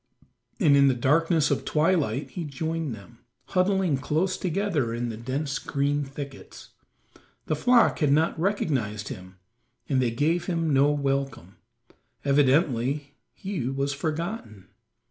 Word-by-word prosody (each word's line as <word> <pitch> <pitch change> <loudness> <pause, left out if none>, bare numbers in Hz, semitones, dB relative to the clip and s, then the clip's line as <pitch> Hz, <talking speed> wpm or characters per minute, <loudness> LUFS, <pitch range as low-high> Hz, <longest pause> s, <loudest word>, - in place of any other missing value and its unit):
And 155 -9 +5
in 140 0 +6
the 130 - +3
darkness 155 +4 +2
of - - 0
twilight 150 -5 +1
he 175 - -5
joined 160 -1 -3
them, 100 -4 -15 0.3
huddling 185 -5 +2
close 160 +7 0
together 170 - -1
in 120 0 -2
the 115 - -5
dense 135 +5 -3
green 145 +1 -1
thickets. 140 0 -9 0.7
The 155 - 0
flock 240 +9 +4
had 150 -4 +2
not 160 +2 +2
recognized 130 - -1
him 95 0 -9 0.5
and 135 -3 +1
they 125 - +2
gave 155 +9 0
him 165 -4 0
no 140 +2 +5
welcome; 135 - -2 0.7
evidently 140 0 +2 0.2
he 190 - -4
was 140 +1 -1
forgotten. 155 - -4
145 Hz, 130 wpm, -26 LUFS, 130-165 Hz, 0.7 s, in